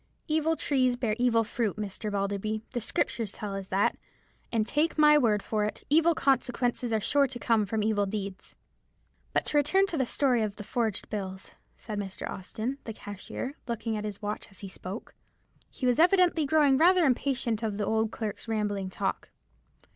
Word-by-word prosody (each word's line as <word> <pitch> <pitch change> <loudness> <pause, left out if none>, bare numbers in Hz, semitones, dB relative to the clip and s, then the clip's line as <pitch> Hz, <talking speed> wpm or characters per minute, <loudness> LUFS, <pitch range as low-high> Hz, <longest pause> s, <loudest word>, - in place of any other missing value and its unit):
Evil 315 0 +2
trees 260 -4 +1
bear 235 -4 -1
evil 235 -2 +3
fruit, 225 -2 -2
Mr. 210 0 -4
Balderby: 205 +2 -2
the 240 - -1
Scriptures 220 -1 -1
tell 205 -2 -5
us 195 -1 -5
that; 195 +1 +1 0.5
and 225 -2 +1
take 305 +8 +1
my 300 -1 +7
word 220 -8 +3
for 215 -1 0
it, 210 - -3
evil 330 +2 +5
consequences 245 -3 +1
are 220 - +2
sure 280 +7 +3
to 255 -1 -6
come 225 -4 +2
from 215 +1 -1
evil 205 -2 +1
deeds." 195 -1 -5 0.8
"But - - +1
to 300 - +2
return 380 +7 +4
to 340 -6 -3
the 260 - +1
story 255 -4 +2
of 210 -2 -2
the 210 - -8
forged 220 -1 -1
bills," 190 -2 -5 0.3
said 210 -2 -5
Mr. 195 -2 -5
Austin, 225 +8 -4
the 225 - -5
cashier, 205 +6 -6
looking 230 -1 -2
at 210 - -3
his 210 0 -5
watch 210 +1 -3
as 195 - -12
he 200 - -6
spoke. 190 +2 -8 0.6
He 255 - -5
was 250 +1 +3
evidently 350 -3 +4
growing 285 -2 +4
rather 355 +2 +5
impatient 250 -4 0
of 215 -3 -2
the 210 - -1
old 220 +1 +1
clerk's 220 0 -5
rambling 205 -3 -1
talk. - - -3
225 Hz, 185 wpm, -28 LUFS, 205-270 Hz, 0.8 s, my